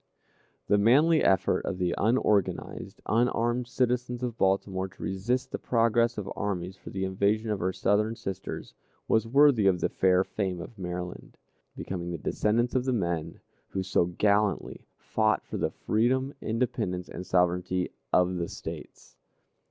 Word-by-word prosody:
The 105 - +4
manly 145 +10 +5
effort 95 -2 +3
of - - -4
the 90 -2 0
unorganized, 105 -3 0
unarmed 120 +2 +1
citizens 125 0 -1
of 120 -2 -2
Baltimore 95 -1 0
to 95 - -12
resist 120 +7 -1
the - - -3
progress 115 0 +2
of 105 - -4
armies 95 -2 -3
for - - -11
the 95 0 -2
invasion 100 +4 0
of 105 - -1
her 95 +2 0
Southern 105 +4 +1
sisters, 95 -4 -6 0.3
was 110 0 +2
worthy 135 -4 +5
of 90 -2 +3
the - - 0
fair 95 0 +3
fame 95 -3 -3
of 90 +6 -9
Maryland; 90 -1 -6 0.4
becoming 85 -2 -4
the 85 - -3
descendants 115 +9 0
of 130 -1 +1
the 130 - +1
men 85 -7 -2 0.3
who 95 - -3
so 95 -2 +2
gallantly 100 +3 0
fought - - 0
for - - -5
the - - 0
freedom, 130 +5 0
independence, 110 -6 -2
and 90 - -7
sovereignty 90 0 +1 0.2
of 90 0 +3
the 85 -1 -2
States. - - -9
100 Hz, 150 wpm, -28 LUFS, 90-120 Hz, 0.4 s, manly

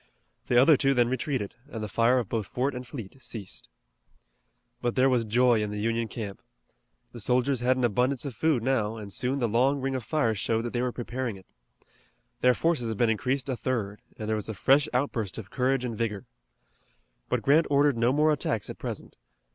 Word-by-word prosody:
The 120 - +4
other 140 +3 +6
two 135 0 +2
then 120 -1 +3
retreated, 130 -5 -2 0.2
and 110 -6 -5
the - - -3
fire 115 +4 +3
of 120 -5 -1
both 110 -3 -2
fort 130 +7 -1
and 125 0 -7
fleet 125 0 -9
ceased. 105 -6 -6 1.1
But 120 -1 -1
there 130 +1 +4
was 120 -2 +2
joy 120 +1 +3
in 105 - -2
the 105 - -5
Union 115 +1 0
camp. 105 -4 -6 0.7
The 120 - -9
soldiers 125 +4 +1
had 125 +2 +2
an 130 - -1
abundance 125 +4 +1
of 140 - -4
food 135 0 +1
now, 115 -4 0
and 105 -3 -7
soon 130 +2 -1
the 120 -4 +1
long 130 +6 +2
ring 135 0 -2
of 130 -2 -3
fires 115 -7 0
showed 115 +2 0
that 120 - -4
they 120 - 0
were 125 0 0
preparing 120 -1 -4
it. 95 - -16 0.9
Their 125 0 +4
forces 160 -9 0
had 110 - -3
been 115 0 +3
increased 130 +6 -1
a 130 - -1
third, 110 -5 -3 0.2
and 110 - -5
there 110 - +1
was 105 0 -4
a 110 - -4
fresh 140 +8 +4
outburst 120 -7 -1
of 100 -4 -8
courage 130 0 +1
and 115 -2 -3
vigor. 110 0 -3 1.0
But - - 0
Grant 150 +4 +4
ordered 145 -1 +4
no 115 +2 +2
more 150 +3 +3
attacks 115 -8 -2
at - - -11
present. - - -6
120 Hz, 210 wpm, -27 LUFS, 110-130 Hz, 1.1 s, other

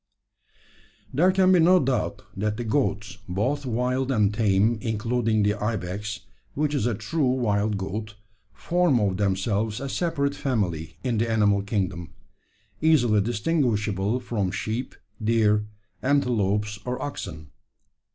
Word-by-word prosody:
"There 175 +8 +4
can 185 0 +4
be 180 - +6
no 180 +3 +6
doubt 135 -4 -1
that 105 +2 -1
the 120 - -3
goats, 105 -5 -1
both 130 +10 -1
wild 125 +3 0
and 105 -4 +2
tame 105 +1 +2
including 115 -1 0
the 105 0 +3
ibex, 105 -1 -3 0.3
which 150 +1 0
is 130 -5 +1
a 120 - 0
true 150 +4 0
wild 105 -4 0
goat 105 +2 -5 0.4
form 175 -7 +1
of 100 -3 0
themselves 105 +2 0
a 140 - -4
separate 140 -2 -1
family 95 - -2
in 120 -4 0
the 115 +1 0
animal 105 -3 +3
kingdom, 95 -5 -3 0.7
easily 120 -10 +4
distinguishable 110 - 0
from 110 -6 -2
sheep, 110 +6 -4 0.3
deer, 105 -1 +2 0.3
antelopes, 105 -7 +1
or 125 0 -3
oxen. 85 - -6
110 Hz, 130 wpm, -25 LUFS, 105-130 Hz, 0.7 s, be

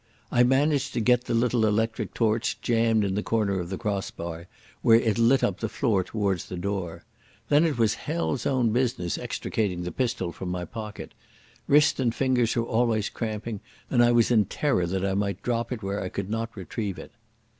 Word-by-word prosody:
I 120 - +4
managed 140 +3 +2
to - - -1
get 125 +2 +3
the - - -1
little 120 0 +2
electric 110 +1 0
torch 115 -1 0
jammed 115 -2 +2
in 100 -1 -1
the 105 - 0
corner 105 -4 0
of 85 -1 -5
the 95 - -3
cross 100 -4 -2
bar, 85 0 -7 0.3
where 115 0 +6
it 110 -1 0
lit 125 +3 +4
up 100 -1 0
the 115 - -2
floor 110 -3 +1
towards 100 -4 -1
the 90 - -7
door. 90 -3 -4 0.5
Then 150 +3 +5
it 155 -6 0
was 110 -2 +3
hell's 150 +1 -2
own 125 -4 +2
business 120 -7 0
extricating 95 -5 -2
the 90 - -4
pistol 115 -9 -1
from 90 +1 -6
my 90 0 -3
pocket. 110 0 -7 0.6
Wrist 150 +1 +4
and 120 -3 +1
fingers 125 -4 +1
were 115 - +1
always 115 -3 +1
cramping, 110 -1 -4 0.3
and 120 -2 +5
I 120 - +5
was 120 0 +3
in 110 -4 +4
terror 100 - 0
that 95 +2 -1
I 95 - 0
might 100 -1 -2
drop 120 0 -1
it 115 -4 -4
where 100 +1 -2
I 90 - -3
could 100 +2 -5
not 115 0 -3
retrieve 95 0 -4
it. - - -10
110 Hz, 200 wpm, -26 LUFS, 100-120 Hz, 0.6 s, where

